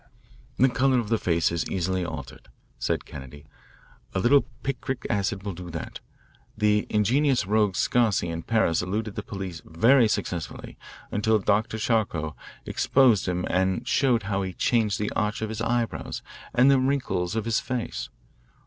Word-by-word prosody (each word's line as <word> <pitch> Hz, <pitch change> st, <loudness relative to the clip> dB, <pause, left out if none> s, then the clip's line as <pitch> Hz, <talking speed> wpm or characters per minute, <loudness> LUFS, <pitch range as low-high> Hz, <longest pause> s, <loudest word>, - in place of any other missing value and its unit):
"The 130 Hz, -, +5 dB
colour 130 Hz, +1 st, +2 dB
of 115 Hz, -4 st, -1 dB
the 115 Hz, -1 st, +2 dB
face 85 Hz, -2 st, +1 dB
is 85 Hz, -2 st, -2 dB
easily 95 Hz, 0 st, -1 dB
altered," 75 Hz, -6 st, -7 dB, 0.3 s
said -, -, -1 dB
Kennedy. 70 Hz, +1 st, -10 dB, 0.7 s
"A -, -, +2 dB
little 135 Hz, +8 st, +4 dB, 0.2 s
picric 135 Hz, -1 st, -3 dB
acid 100 Hz, 0 st, -1 dB
will 100 Hz, -2 st, -4 dB
do 90 Hz, +1 st, -8 dB
that. 85 Hz, -1 st, -6 dB, 0.6 s
The 105 Hz, -1 st, +2 dB
ingenious 125 Hz, +3 st, +2 dB
rogue 105 Hz, -1 st, +2 dB
Sarcey 110 Hz, -6 st, +2 dB
in 85 Hz, 0 st, -4 dB
Paris 110 Hz, -5 st, +1 dB
eluded 105 Hz, +4 st, -3 dB
the -, -, -4 dB
police 95 Hz, -5 st, -6 dB
very 115 Hz, +9 st, +4 dB
successfully 95 Hz, -5 st, -4 dB, 0.4 s
until 110 Hz, +1 st, +2 dB
Dr. 105 Hz, +2 st, +1 dB
Charcot 105 Hz, -9 st, 0 dB, 0.3 s
exposed 125 Hz, -9 st, +3 dB
him 90 Hz, 0 st, -1 dB
and 95 Hz, 0 st, 0 dB
showed 125 Hz, -5 st, +2 dB
how 100 Hz, 0 st, -1 dB
he 95 Hz, -1 st, -4 dB
changed 110 Hz, +1 st, +1 dB
the 105 Hz, -, -2 dB
arch 105 Hz, +1 st, -1 dB
of 110 Hz, -, -2 dB
his 110 Hz, 0 st, -4 dB
eyebrows 120 Hz, 0 st, -2 dB, 0.3 s
and 130 Hz, +3 st, +5 dB
the 135 Hz, -, +5 dB
wrinkles 130 Hz, -9 st, 0 dB
of 110 Hz, -1 st, -1 dB
his 115 Hz, -1 st, +1 dB
face. 115 Hz, -, -4 dB
105 Hz, 160 wpm, -26 LUFS, 90-115 Hz, 0.7 s, The